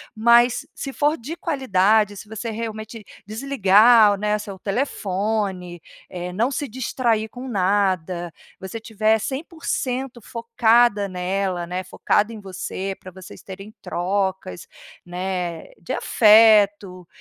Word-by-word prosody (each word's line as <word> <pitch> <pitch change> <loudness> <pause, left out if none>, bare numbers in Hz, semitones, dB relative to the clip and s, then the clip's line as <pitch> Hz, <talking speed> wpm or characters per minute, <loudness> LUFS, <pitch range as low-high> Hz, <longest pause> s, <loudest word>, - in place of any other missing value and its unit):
Mas 235 +2 +4
se 275 - -6
for 295 +3 0
de 290 +9 -7
qualidade, 215 - +1
se 210 - -10
você 220 +2 -6
realmente 220 -1 -6 0.2
desligar, 215 -3 +4
né, 210 +1 0
o - - -3
seu 200 -2 -8
telefone, 195 -4 -2 0.3
eh, 180 0 -6
não 230 +7 +1
se 285 +1 -3
distrair 230 -2 -1
com 255 +3 -9
nada, 185 -4 0 0.3
você 190 +4 -7
estiver 220 0 +1
100% 265 - -4
focada 230 -2 +2
nela, 185 -1 -2
né, 180 +1 -4
focado 205 +4 0
em 220 - -8
você 190 0 -5
para 185 - -11
vocês 185 -1 -13
terem 195 +2 -10
trocas, 190 - -3 0.4
né, 180 -2 -4
de 170 - -5
afeto, 205 -4 +4
210 Hz, 120 wpm, -22 LUFS, 190-230 Hz, 0.4 s, Mas